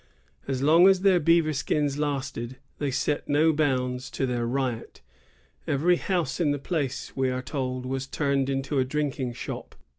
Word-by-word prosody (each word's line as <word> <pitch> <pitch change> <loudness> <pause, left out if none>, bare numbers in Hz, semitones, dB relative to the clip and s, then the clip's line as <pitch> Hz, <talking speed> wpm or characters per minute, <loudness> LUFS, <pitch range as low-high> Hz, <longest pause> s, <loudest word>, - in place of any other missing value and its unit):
As 135 -1 -2
long 165 +5 +7
as 190 -1 +4
their 190 -2 +5
beaver 165 -1 +3
skins 145 0 0
lasted, 135 -4 -3 0.2
they 145 - 0
set 140 +3 -1
no 155 +3 +4
bounds 130 -4 0
to 135 - -2
their 120 -2 -1
riot. 125 -2 -3 0.7
Every 170 +6 +3
house 180 -2 -1
in 165 -4 +2
the 145 - +1
place, 140 -3 -3
we 130 -1 +1
are 130 0 -3
told, 130 -2 -3
was 135 +1 -3
turned 140 -3 0
into 135 +1 -1
a - - +4
drinking 135 -2 -2
shop. - - -7
140 Hz, 170 wpm, -26 LUFS, 130-155 Hz, 0.7 s, long